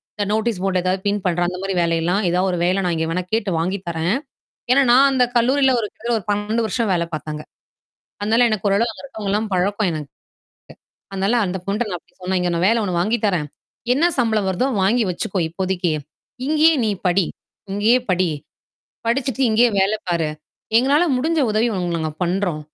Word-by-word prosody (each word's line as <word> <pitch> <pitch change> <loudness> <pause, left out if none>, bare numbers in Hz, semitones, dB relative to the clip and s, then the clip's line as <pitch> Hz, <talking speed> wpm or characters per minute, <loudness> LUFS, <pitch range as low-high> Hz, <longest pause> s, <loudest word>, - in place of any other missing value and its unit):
இந்த 205 - -1
நோட்டீஸ் 220 -3 -1
போர்ட்ல 185 -2 0
எதாவது 185 +1 0
பின் 205 0 0
பண்ற 175 -1 +1
அந்தமாரி 190 +2 -3
வேலை 170 0 +1
எல்லாம். 185 +5 +1
ஏதாவது 180 +2 +1
ஒரு 175 - -2
வேலை 185 +2 +2
நான் 170 -2 0
இங்க 160 0 -1
வேணா 180 +2 -1
கேட்டு 210 -4 0
வாங்கி 185 +4 -1
தரேன்." 170 +6 0 0.6
ஏன்னா 275 +1 +5
நான் 275 +2 +7
அந்தக் 250 -2 +1
கல்லூரியில 265 +2 +3
ஒரு 210 - -2
கிட்டத்தட்ட 235 +1 -2
ஒரு 190 - -14
12 215 +3 0
வருஷம் 230 -4 -1
வேலை 170 -1 0
பார்த்தேன் 155 0 -4
அங்க. 150 - -8 0.8
அதனால 225 +4 +3
எனக்கு 210 -1 -1
ஒரு 200 - +3
அளவு 235 0 +1
அங்க - - -13
இருக்கவங்க 220 -7 -5
எல்லாம் 215 +1 0
பழக்கம் 200 +2 +1
எனக்கு. 150 -3 -6 1.0
அதனால 195 +4 0
அந்தப் 180 0 -5
பொண்ட்ட 210 -1 -1
அப்பிடி - - -27
சொன்னேன். 185 0 -1
"இங்க 175 - 0
நான் 170 +2 +1
வேலை 230 0 +2
ஒண்ணு 180 -3 -1
வாங்கி 220 +6 +1
தரேன். 170 -6 0 0.5
என்ன 310 +6 +2
சம்பளம் 220 -5 +1
வருதோ 220 +9 0 0.2
வாங்கி 230 +4 +3
வச்சுக்கோ 185 +2 -2
இப்போதைக்கு. 180 -1 -1 0.6
இங்கயே 315 +1 +4
நீ - - +1 0.2
படி! 180 0 +2 0.5
இங்கேயே 215 +5 +3
படி! 185 0 +2 0.8
படிச்சுட்டு 265 +2 0
இங்கேயே 235 +3 +4
வேலை 205 +3 +2
பாரு! 165 -3 0 0.5
எங்களால 280 +7 +4
முடிஞ்ச 315 +4 +1
உதவிய 220 +2 +1
உங்களுக்கு 175 -1 -1
நாங்க 160 -1 -2
பண்றோம். 180 -3 -1
200 Hz, 185 wpm, -20 LUFS, 180-235 Hz, 1.0 s, நான்